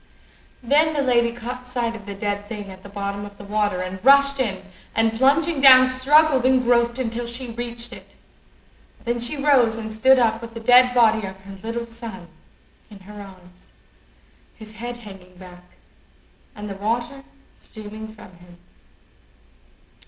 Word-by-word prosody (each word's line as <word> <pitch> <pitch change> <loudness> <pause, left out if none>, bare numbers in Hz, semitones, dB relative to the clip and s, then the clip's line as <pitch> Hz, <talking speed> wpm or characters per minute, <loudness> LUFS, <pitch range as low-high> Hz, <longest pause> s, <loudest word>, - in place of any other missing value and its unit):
Then 305 +5 +2
the 285 - 0
lady 235 -2 +2
caught 245 +2 -8
sight 240 -2 -3
of 210 -3 -12
the 200 - -6
dead 205 0 -4
thing 205 -3 -7
at 190 0 -13
the 200 - -12
bottom 200 0 -5
of 205 0 -11
the - - -11
water, 205 -2 -1
and 185 +1 -7
rushed 280 +1 +5
in, 195 -7 -2 0.3
and, 225 0 +2
plunging 280 +5 +2
down, 255 -2 +8
struggled 270 +1 +3
and 260 0 +3
groped 235 0 +2
until 240 -1 -3
she 235 +1 -6
reached 235 0 -7
it. - - -15 0.9
Then 240 0 -1
she 240 +5 -1
rose 265 -6 +3
and 220 -1 -6
stood 260 +5 +4
up 225 -2 +1
with 230 0 -10
the - - -5
dead 250 +2 +5
body 220 -3 +3
of 190 0 -9
her 195 0 -11
little 230 +2 -4
son 230 -6 -10 0.6
in 205 -2 -14
her 205 +2 -11
arms, 185 -2 -16 0.8
his 220 -1 -12
head 240 +2 -7
hanging 195 -5 -14
back, 180 -1 -16 0.8
and 210 -1 -8
the 200 - -5
water 235 +6 -3 0.3
streaming 215 0 -11
from 215 -4 -15
him. 175 0 -18
230 Hz, 165 wpm, -22 LUFS, 205-250 Hz, 0.9 s, down